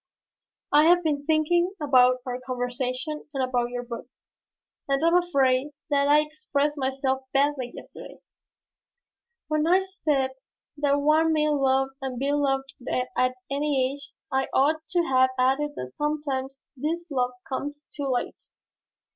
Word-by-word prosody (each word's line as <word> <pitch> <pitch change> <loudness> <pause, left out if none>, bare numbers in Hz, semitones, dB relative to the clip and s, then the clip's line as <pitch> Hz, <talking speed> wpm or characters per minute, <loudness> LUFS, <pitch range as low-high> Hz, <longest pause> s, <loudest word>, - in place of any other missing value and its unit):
"I 295 +1 +6
have 350 +1 +5
been 290 -2 -1
thinking 345 +4 +2
about 255 -4 +4
our 250 -1 -3
conversation 255 +3 -3
and 265 - +1
about 245 -1 0
your 245 0 -4
book, 235 0 -7 0.8
and 275 +2 +1
I - - +4
am 335 - +4
afraid 280 -5 +2 0.2
that 280 0 +3
I 295 +1 +6
expressed 300 -1 -2
myself 265 -1 -1
badly 275 -3 +1
yesterday. - - -11 1.3
When 305 0 +1
I 370 +3 +5
said 300 -9 -1 0.5
that 285 -1 +2
one 310 +2 +4
may 305 -1 +2
love 270 -2 +2
and 260 -2 -4
be 275 +3 0
loved 270 -2 0 0.2
at 255 0 0 0.2
any 275 -2 +1
age 280 0 -10 0.2
I 265 0 +1
ought 305 +4 +3
to 350 -1 +2
have 260 -4 +3
added 270 +4 +1
that 125 0 -6
sometimes 275 -3 -2
this 325 +6 -2
love 250 -2 0
comes 290 +2 -5
too 285 -2 -3
late. 250 -2 -3
280 Hz, 145 wpm, -26 LUFS, 260-300 Hz, 1.3 s, I